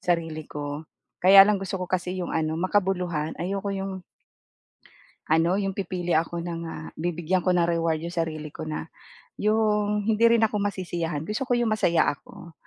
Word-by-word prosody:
sarili 165 Hz, -3 st, -1 dB
ko. 145 Hz, +1 st, -5 dB, 0.4 s
Kaya 195 Hz, +2 st, +9 dB
lang 210 Hz, 0 st, +2 dB
gusto 195 Hz, 0 st, -3 dB
ko 180 Hz, -, -3 dB
kasi 185 Hz, 0 st, -1 dB
yung 175 Hz, -, -3 dB
ano, 155 Hz, -1 st, 0 dB
makabuluhan. 180 Hz, -5 st, 0 dB
Ayoko 195 Hz, +2 st, -2 dB
yung 195 Hz, 0 st, -3 dB, 1.4 s
ano, 165 Hz, +2 st, +3 dB
yung 195 Hz, -1 st, -2 dB
pipili 180 Hz, -2 st, -3 dB
ako 170 Hz, +1 st, -1 dB
ng, 170 Hz, -1 st, -4 dB
ah, 160 Hz, -, -7 dB
bibigyan 175 Hz, +2 st, -1 dB
ko 180 Hz, -, +3 dB
ng 170 Hz, -, +3 dB
reward 165 Hz, -2 st, 0 dB
yung 170 Hz, -, -5 dB
sarili 155 Hz, -2 st, -2 dB
ko -, -, -6 dB
na 155 Hz, -, -4 dB, 0.6 s
yung 210 Hz, -1 st, +1 dB
hindi 220 Hz, +1 st, +3 dB
rin 230 Hz, -, +1 dB
ako 215 Hz, -1 st, 0 dB
masisiyahan. 175 Hz, -6 st, -2 dB
Gusto 215 Hz, +9 st, -2 dB
ko -, -, +1 dB
yung 240 Hz, -1 st, +1 dB
masaya 175 Hz, -6 st, +2 dB
ako. 170 Hz, +4 st, -13 dB
175 Hz, 170 wpm, -25 LUFS, 165-195 Hz, 1.4 s, Kaya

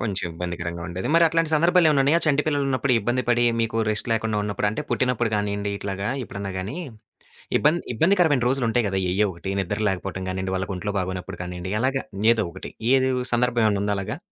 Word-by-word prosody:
కొంచెం 100 Hz, -7 st, -2 dB
ఇబ్బందికరంగా 85 Hz, 0 st, -5 dB
ఉండేది. 90 Hz, +2 st, -4 dB
మరి 170 Hz, 0 st, +6 dB
అట్లాంటి 165 Hz, -1 st, +1 dB
సందర్భాలేమన్నా 160 Hz, -3 st, +4 dB
ఉన్నాయా? 150 Hz, +5 st, +4 dB
చంటిపిల్లలున్నప్పుడు 140 Hz, -3 st, +1 dB
ఇబ్బంది 120 Hz, +4 st, 0 dB
పడి 120 Hz, 0 st, +3 dB, 0.2 s
మీకు 115 Hz, 0 st, -1 dB
రెస్ట్ 105 Hz, +2 st, -2 dB
లేకుండా 110 Hz, -1 st, 0 dB
ఉన్నప్పుడు 105 Hz, 0 st, -1 dB
అంటే 110 Hz, -, -4 dB
పుట్టినప్పుడు 125 Hz, -3 st, +1 dB
గానియండి 100 Hz, 0 st, -2 dB
ఇట్లాగా, 100 Hz, 0 st, -3 dB, 0.2 s
ఎప్పుడన్నా 100 Hz, -1 st, -6 dB
గాని? 95 Hz, -, -4 dB, 0.8 s
ఇబ్బంది 155 Hz, +4 st, +3 dB
ఇబ్బందికరమైన 165 Hz, -, +3 dB
రోజులుంటాయి 120 Hz, -3 st, +1 dB
గదా! 95 Hz, 0 st, -1 dB
ఎయ్యో 105 Hz, +3 st, +2 dB
ఒకటి 85 Hz, +3 st, -6 dB
నిద్ర 90 Hz, -, -2 dB
లేకపోవటం 95 Hz, 0 st, -4 dB
గానియండి, 95 Hz, 0 st, -3 dB
వాళ్ళకి 95 Hz, +1 st, -3 dB
ఒంట్లో 100 Hz, +3 st, -3 dB
బాగనొప్పుడు 95 Hz, -1 st, -4 dB
కానియండి, 90 Hz, +1 st, -5 dB
అలాగా 135 Hz, +1 st, +1 dB, 0.3 s
ఏదో 110 Hz, -2 st, 0 dB
ఒకటి. 95 Hz, -, -8 dB, 0.2 s
ఏది 130 Hz, 0 st, +3 dB
వ్ -, -, -1 dB
సందర్భమేమైనా 115 Hz, -4 st, +2 dB
ఉందా 105 Hz, 0 st, 0 dB
అలాగా? 95 Hz, -, -4 dB
110 Hz, 170 wpm, -24 LUFS, 95-135 Hz, 0.8 s, మరి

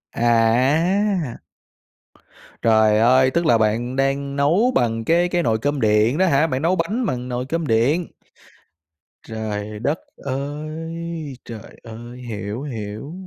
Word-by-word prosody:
À! 135 Hz, -, +2 dB, 1.2 s
Trời 110 Hz, -2 st, +4 dB
ơi, 130 Hz, +3 st, +4 dB
tức 170 Hz, +2 st, 0 dB
là 120 Hz, -, +5 dB
bạn 115 Hz, +4 st, 0 dB
đang 140 Hz, +1 st, -1 dB
nấu 170 Hz, -, +3 dB
bằng 115 Hz, -2 st, 0 dB
cái 175 Hz, +4 st, +2 dB
cái 175 Hz, -1 st, 0 dB
nồi 110 Hz, -2 st, +1 dB
cơm 145 Hz, +1 st, -1 dB
điện 110 Hz, +5 st, +3 dB
đó 190 Hz, -, +3 dB
hả, 150 Hz, -1 st, +3 dB
bạn 130 Hz, -3 st, -2 dB
nấu 170 Hz, +4 st, +2 dB
bánh 205 Hz, +9 st, -1 dB
bằng 125 Hz, -, -3 dB
nồi 125 Hz, +1 st, -3 dB
cơm 165 Hz, +2 st, -2 dB
điện? 135 Hz, +10 st, +2 dB, 1.2 s
Trời 105 Hz, -1 st, -5 dB
đất 145 Hz, +8 st, -1 dB, 0.2 s
ơi, 155 Hz, +3 st, -5 dB
trời 110 Hz, -3 st, -10 dB
ơi! 120 Hz, +2 st, -10 dB
Hiểu, 105 Hz, +2 st, -5 dB
hiểu, 110 Hz, 0 st, -6 dB
130 Hz, 135 wpm, -21 LUFS, 115-160 Hz, 1.2 s, là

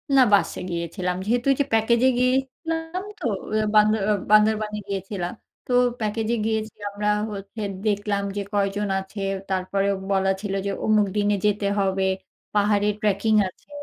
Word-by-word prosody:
না 265 Hz, -, +7 dB
বাসে 200 Hz, -, +3 dB
গিয়েছিলাম, 175 Hz, +1 st, -2 dB
যেহেতু 240 Hz, +4 st, 0 dB
ওই 275 Hz, -, +3 dB
যে 280 Hz, -, +1 dB
প্যাকেজে 235 Hz, +3 st, +4 dB
গিয়েছিলাম 325 Hz, +7 st, -1 dB
তো, 360 Hz, -, -7 dB, 0.5 s
বান্দর 215 Hz, 0 st, +4 dB
আ -, -, +4 dB, 0.2 s
বান্দরবানে 215 Hz, 0 st, +4 dB
গিয়েছিলাম। 195 Hz, -2 st, -4 dB, 0.3 s
তো -, -, -4 dB, 0.3 s
প্যাকেজে 220 Hz, +1 st, -1 dB
গিয়েছি 220 Hz, 0 st, -1 dB, 0.2 s
আমরা 205 Hz, +1 st, -3 dB, 0.3 s
হচ্ছে 200 Hz, +2 st, -7 dB, 0.2 s
দেখলাম 205 Hz, -1 st, 0 dB
যে 205 Hz, -, -1 dB
কয়জন 205 Hz, 0 st, 0 dB
আছে। 195 Hz, +2 st, -7 dB, 0.3 s
তারপরেও 195 Hz, +1 st, 0 dB, 0.2 s
বলা 195 Hz, 0 st, +2 dB
ছিল 205 Hz, -2 st, -3 dB
যে 200 Hz, -, 0 dB
অমুক 215 Hz, -1 st, +4 dB
দিনে 205 Hz, 0 st, +2 dB
যেতে 205 Hz, -1 st, +1 dB
হবে, 195 Hz, -1 st, +1 dB, 0.5 s
পাহাড়ে 205 Hz, 0 st, +2 dB
ট্র্যাকিং 210 Hz, +1 st, +1 dB
আছে, 185 Hz, -, -14 dB
210 Hz, 145 wpm, -24 LUFS, 200-220 Hz, 0.5 s, না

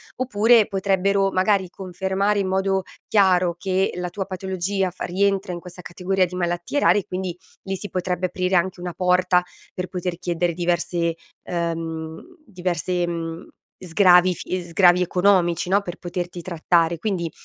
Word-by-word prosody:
oppure 230 Hz, -2 st, +4 dB
potrebbero 195 Hz, 0 st, +1 dB
magari 190 Hz, 0 st, +2 dB
confermare 190 Hz, +2 st, -1 dB
in 195 Hz, -, 0 dB
modo 190 Hz, 0 st, 0 dB, 0.2 s
chiaro 185 Hz, -4 st, +3 dB
che 190 Hz, 0 st, 0 dB
la 180 Hz, 0 st, -3 dB
tua 195 Hz, +2 st, -4 dB
patologia 190 Hz, 0 st, -2 dB
fa 180 Hz, -, -8 dB
rientra 195 Hz, 0 st, 0 dB
in 175 Hz, -, -5 dB
questa 180 Hz, +1 st, -11 dB
categoria 185 Hz, +2 st, 0 dB
di 180 Hz, +1 st, -8 dB
malattie 175 Hz, +8 st, -1 dB
rare 210 Hz, -, +4 dB
e 185 Hz, -, -7 dB
quindi 185 Hz, -2 st, -4 dB, 0.3 s
lì 195 Hz, 0 st, -3 dB
si 205 Hz, +2 st, -7 dB
potrebbe 180 Hz, 0 st, -1 dB
aprire 185 Hz, +1 st, -1 dB
anche 180 Hz, +1 st, +1 dB
una 175 Hz, 0 st, -5 dB
porta 180 Hz, 0 st, +2 dB, 0.3 s
per 180 Hz, 0 st, -4 dB
poter 180 Hz, -1 st, -4 dB
chiedere 175 Hz, -1 st, -1 dB
diversi 175 Hz, -1 st, -1 dB, 0.3 s
ehm, 165 Hz, -2 st, -4 dB, 0.2 s
diverse, 180 Hz, -3 st, -2 dB
mhmm, 165 Hz, -1 st, -5 dB, 0.3 s
sgravi 180 Hz, 0 st, +5 dB
fi 180 Hz, +2 st, -4 dB
sgravi 175 Hz, +1 st, +4 dB
economici, 180 Hz, -2 st, +2 dB
no, 200 Hz, +2 st, +3 dB
per 175 Hz, -3 st, -6 dB
poterti 175 Hz, 0 st, -5 dB
trattare. 170 Hz, -1 st, +1 dB
Quindi, 175 Hz, -4 st, -2 dB
180 Hz, 150 wpm, -22 LUFS, 175-190 Hz, 0.3 s, sgravi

